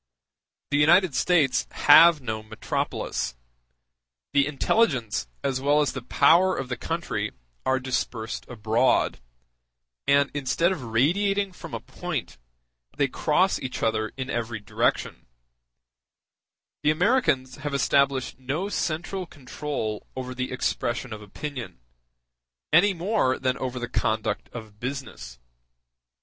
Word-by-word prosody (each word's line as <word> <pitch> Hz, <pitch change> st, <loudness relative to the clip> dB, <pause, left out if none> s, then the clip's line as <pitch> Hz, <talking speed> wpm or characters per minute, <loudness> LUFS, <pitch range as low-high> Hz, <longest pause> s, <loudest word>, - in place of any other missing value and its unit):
The 145 Hz, -, +3 dB
United 170 Hz, +2 st, +5 dB
States 145 Hz, -3 st, +2 dB
have 160 Hz, +1 st, +7 dB
no 110 Hz, -3 st, -3 dB
metropolis; 110 Hz, -, -3 dB, 1.0 s
the 140 Hz, -1 st, +4 dB
intelligence 135 Hz, -, +1 dB, 0.2 s
as 135 Hz, -2 st, -1 dB
well 145 Hz, +2 st, +3 dB
as 150 Hz, -, +1 dB
the 135 Hz, -, -5 dB
power 180 Hz, +9 st, +4 dB
of 130 Hz, -, -4 dB
the 125 Hz, -, -1 dB
country -, -, -3 dB, 0.3 s
are 130 Hz, 0 st, +3 dB
dispersed 125 Hz, -3 st, -3 dB
abroad, 115 Hz, -, +1 dB, 0.9 s
and 140 Hz, 0 st, +4 dB
instead 145 Hz, +5 st, +1 dB
of 185 Hz, -7 st, -3 dB
radiating 195 Hz, -, +1 dB
from 180 Hz, -, -8 dB
a -, -, -3 dB
point, -, -, -5 dB, 0.6 s
they 140 Hz, -, +3 dB
cross 175 Hz, +8 st, +1 dB
each 130 Hz, -2 st, -5 dB
other 110 Hz, -1 st, 0 dB
in 130 Hz, 0 st, -4 dB
every 115 Hz, -1 st, -3 dB
direction; 105 Hz, -, -1 dB, 1.5 s
the 150 Hz, -, +2 dB
Americans 155 Hz, -, +2 dB
have 145 Hz, 0 st, -4 dB
established 140 Hz, -2 st, +1 dB
no 145 Hz, +10 st, -2 dB
central 180 Hz, +1 st, -2 dB
control 130 Hz, -6 st, -5 dB
over 130 Hz, -1 st, -5 dB
the 125 Hz, 0 st, -4 dB
expression 125 Hz, -1 st, -2 dB
of 105 Hz, -, -8 dB
opinion, 120 Hz, -, -7 dB, 0.9 s
any 190 Hz, +4 st, +5 dB
more 175 Hz, -7 st, +1 dB
than 130 Hz, -1 st, 0 dB
over 130 Hz, -1 st, -3 dB
the 120 Hz, 0 st, -3 dB
conduct 110 Hz, -2 st, -1 dB
of 110 Hz, -3 st, -10 dB
business. 125 Hz, -, -6 dB
135 Hz, 120 wpm, -25 LUFS, 120-155 Hz, 1.5 s, have